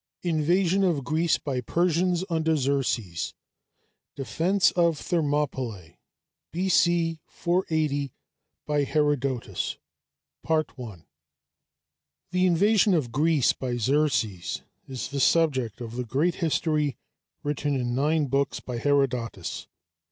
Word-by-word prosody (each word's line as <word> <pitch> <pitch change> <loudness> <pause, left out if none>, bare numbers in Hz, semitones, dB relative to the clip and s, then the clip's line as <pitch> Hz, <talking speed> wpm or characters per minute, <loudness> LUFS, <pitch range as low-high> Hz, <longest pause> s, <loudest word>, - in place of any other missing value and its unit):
INVASION 175 +3 +2
OF 165 -7 +1
GREECE 160 +5 +1
BY 135 -4 -3
PERSIANS 175 +5 +1
UNDER 160 -2 +1
XERXES 125 - -1 0.8
DEFENCE 175 +8 +2
OF 170 -3 +2
THERMOPYLÆ 135 - -2 0.6
B.C. 170 -2 +2
480 155 -6 -1 0.7
HERODOTUS 140 -4 -1 2.5
The 180 0 +3
invasion 200 +3 +4
of 135 -8 -1
Greece 150 +1 +3
by 125 -2 -3
Xerxes 115 - 0 0.2
is 130 -2 -5
the 140 0 -3
subject 130 -7 +2
of 115 -1 -6
the 125 - -2
great 145 +9 +1
history 155 -4 0 0.5
written 145 0 -1
in 120 -2 -1
nine 150 +4 +2
books 140 +1 0
by 120 -2 -5
Herodotus. 125 - -1
150 Hz, 95 wpm, -26 LUFS, 130-170 Hz, 2.5 s, invasion